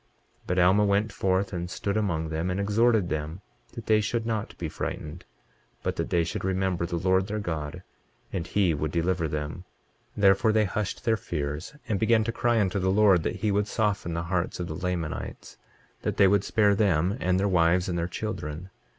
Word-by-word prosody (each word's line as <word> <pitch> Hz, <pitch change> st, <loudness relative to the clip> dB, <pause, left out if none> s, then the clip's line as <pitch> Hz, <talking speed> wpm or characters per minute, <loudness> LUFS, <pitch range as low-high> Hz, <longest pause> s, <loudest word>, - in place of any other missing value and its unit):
23:27 -, -, -23 dB
But 90 Hz, -, -1 dB
Alma 95 Hz, +3 st, +5 dB
went 100 Hz, +2 st, +1 dB
forth 95 Hz, +1 st, 0 dB
and 90 Hz, -1 st, -3 dB
stood 100 Hz, +2 st, -3 dB
among 85 Hz, -7 st, 0 dB
them, 80 Hz, +3 st, -2 dB
and 90 Hz, +2 st, -1 dB
exhorted 105 Hz, 0 st, +3 dB
them 80 Hz, +4 st, -4 dB, 0.3 s
that 115 Hz, -, -8 dB
they 110 Hz, -1 st, +4 dB
should 115 Hz, +2 st, -1 dB
not 110 Hz, -2 st, -3 dB
be 85 Hz, -, -3 dB
frightened, 80 Hz, +2 st, -5 dB, 0.6 s
but -, -, -1 dB
that -, -, -2 dB
they 85 Hz, -1 st, +2 dB
should 80 Hz, -, -4 dB
remember 95 Hz, -2 st, 0 dB
the 85 Hz, -, -2 dB
Lord 95 Hz, +2 st, +2 dB
their 105 Hz, +1 st, -3 dB
God 85 Hz, -3 st, -4 dB, 0.5 s
and 85 Hz, -3 st, -3 dB
he 95 Hz, -3 st, +2 dB
would 75 Hz, 0 st, -2 dB
deliver 85 Hz, 0 st, 0 dB
them. 75 Hz, +3 st, -4 dB, 0.5 s
23:28 -, -, -3 dB
Therefore 100 Hz, +3 st, +5 dB
they 110 Hz, -1 st, +3 dB
hushed 100 Hz, +1 st, -3 dB
their 115 Hz, -1 st, +3 dB
fears, 75 Hz, -, -4 dB
and 105 Hz, -3 st, 0 dB
began 110 Hz, 0 st, +3 dB
to 115 Hz, -, -1 dB
cry 120 Hz, 0 st, +1 dB
unto 100 Hz, -1 st, +1 dB
the 95 Hz, 0 st, +1 dB
Lord 100 Hz, -3 st, +5 dB
that -, -, -2 dB
he 105 Hz, -, +3 dB
would 105 Hz, +1 st, +1 dB
soften 100 Hz, -7 st, -1 dB
the 85 Hz, -, -2 dB
hearts 90 Hz, 0 st, -2 dB
of 90 Hz, -, -2 dB
the 80 Hz, -, -5 dB
Lamanites, 85 Hz, -2 st, -4 dB, 0.4 s
that -, -, -2 dB
they 100 Hz, -, +6 dB
would 100 Hz, 0 st, +3 dB
spare 105 Hz, -1 st, +3 dB
them, 95 Hz, -2 st, +2 dB
and 90 Hz, 0 st, +2 dB
their 100 Hz, -, +2 dB
wives, 90 Hz, -1 st, +3 dB
and 90 Hz, -, -2 dB
their 85 Hz, 0 st, -1 dB
children. 90 Hz, -3 st, -5 dB
95 Hz, 205 wpm, -27 LUFS, 85-105 Hz, 0.6 s, they